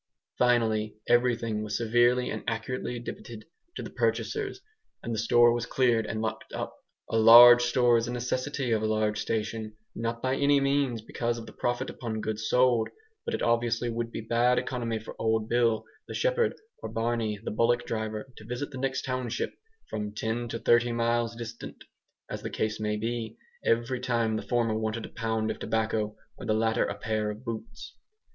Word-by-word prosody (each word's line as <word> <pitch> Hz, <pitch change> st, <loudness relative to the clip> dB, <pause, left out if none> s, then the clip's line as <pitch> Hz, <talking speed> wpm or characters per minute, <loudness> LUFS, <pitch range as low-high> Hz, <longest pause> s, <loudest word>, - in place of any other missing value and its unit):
Finally, 110 Hz, -3 st, +2 dB
everything 120 Hz, -3 st, +2 dB
was 105 Hz, -1 st, -2 dB
severely 120 Hz, +2 st, +3 dB
and 110 Hz, -, -4 dB
accurately 120 Hz, +2 st, -3 dB
debited 115 Hz, -1 st, -8 dB, 0.3 s
to -, -, -5 dB
the -, -, -6 dB
purchasers, 415 Hz, -2 st, -1 dB, 0.4 s
and 115 Hz, -, -3 dB
the 110 Hz, -, -1 dB
store 120 Hz, +1 st, +5 dB
was 120 Hz, 0 st, -2 dB
cleared 120 Hz, -4 st, +2 dB
and 110 Hz, 0 st, -3 dB
locked 110 Hz, -, -4 dB
up. -, -, -4 dB, 0.4 s
A 115 Hz, -, +2 dB
large 120 Hz, +2 st, +10 dB
store 120 Hz, -1 st, +4 dB
is 115 Hz, -, -3 dB
a -, -, -3 dB
necessity 130 Hz, +2 st, -2 dB
of 110 Hz, -1 st, +2 dB
a 110 Hz, -, 0 dB
large 110 Hz, -1 st, 0 dB
station; 110 Hz, -1 st, -3 dB, 0.2 s
not 115 Hz, 0 st, -3 dB
by 130 Hz, +2 st, 0 dB
any 140 Hz, +1 st, +4 dB
means 135 Hz, -4 st, +1 dB
because 120 Hz, +1 st, -2 dB
of 115 Hz, -, -7 dB
the -, -, -12 dB
profit 120 Hz, +2 st, -1 dB
upon 110 Hz, -3 st, -4 dB
goods 110 Hz, 0 st, -3 dB
sold, 125 Hz, -3 st, +3 dB, 0.4 s
but -, -, -1 dB
it -, -, -3 dB
obviously 120 Hz, 0 st, +1 dB
would 115 Hz, 0 st, -3 dB
be -, -, -5 dB
bad 120 Hz, +3 st, +2 dB
economy 120 Hz, -3 st, -2 dB
for 110 Hz, -, -9 dB
old 110 Hz, -1 st, +1 dB
Bill, 115 Hz, -2 st, +2 dB, 0.2 s
the -, -, -6 dB
shepherd, -, -, +1 dB, 0.2 s
or -, -, -6 dB
Barney, 115 Hz, -1 st, -1 dB
the -, -, -3 dB
bullock 120 Hz, +2 st, +2 dB
driver, 110 Hz, -1 st, -3 dB
to -, -, -11 dB
visit 125 Hz, +6 st, -4 dB
the 130 Hz, -, -7 dB
next 130 Hz, 0 st, -1 dB
township, 130 Hz, -3 st, -2 dB, 0.4 s
from 105 Hz, -1 st, -4 dB
ten 110 Hz, +2 st, -2 dB
to 115 Hz, -, -4 dB
thirty 120 Hz, +1 st, +3 dB
miles 115 Hz, 0 st, 0 dB
distant, 115 Hz, 0 st, -8 dB, 0.4 s
as -, -, -6 dB
the -, -, -4 dB
case 110 Hz, 0 st, -2 dB
may 105 Hz, 0 st, -1 dB
be, 115 Hz, 0 st, -3 dB, 0.3 s
every 120 Hz, +2 st, +1 dB
time 115 Hz, -3 st, 0 dB
the 110 Hz, -, -2 dB
former 120 Hz, -3 st, 0 dB
wanted 110 Hz, +1 st, -2 dB
a -, -, -9 dB
pound 110 Hz, -1 st, -1 dB
of -, -, -7 dB
tobacco, 110 Hz, -1 st, -1 dB, 0.2 s
or -, -, -8 dB
the 110 Hz, -, +2 dB
latter 110 Hz, 0 st, +2 dB
a 100 Hz, -, -3 dB
pair 110 Hz, -1 st, -1 dB
of 105 Hz, +4 st, -7 dB
boots. 110 Hz, -1 st, -7 dB
115 Hz, 185 wpm, -28 LUFS, 110-120 Hz, 0.4 s, large